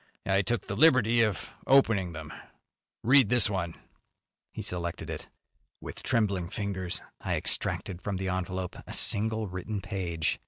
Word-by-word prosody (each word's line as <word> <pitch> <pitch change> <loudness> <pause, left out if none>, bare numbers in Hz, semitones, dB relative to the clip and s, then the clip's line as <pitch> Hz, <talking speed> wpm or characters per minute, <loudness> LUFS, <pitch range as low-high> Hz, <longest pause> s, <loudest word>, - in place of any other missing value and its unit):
I 95 0 +3
took 120 +4 -1
the 100 - -4
liberty 120 -4 +5
of 105 -6 -1 0.2
opening 115 -9 +4
them. 80 -2 -8 0.7
Read 130 -1 +6
this 120 -4 +4
one." 85 -4 -2 0.8
He - - -6
selected 85 -1 -4
it. - - -7 0.5
With - - -8
trembling 100 -6 0
fingers 95 -3 -2 0.2
I - - -1
extracted 95 -2 +1
from 100 0 -3
the 95 0 -3
envelope 95 0 -3
a - - -7
single 110 +1 +2
written 95 +2 -4
page. 90 -5 -2
100 Hz, 145 wpm, -29 LUFS, 90-110 Hz, 0.8 s, Read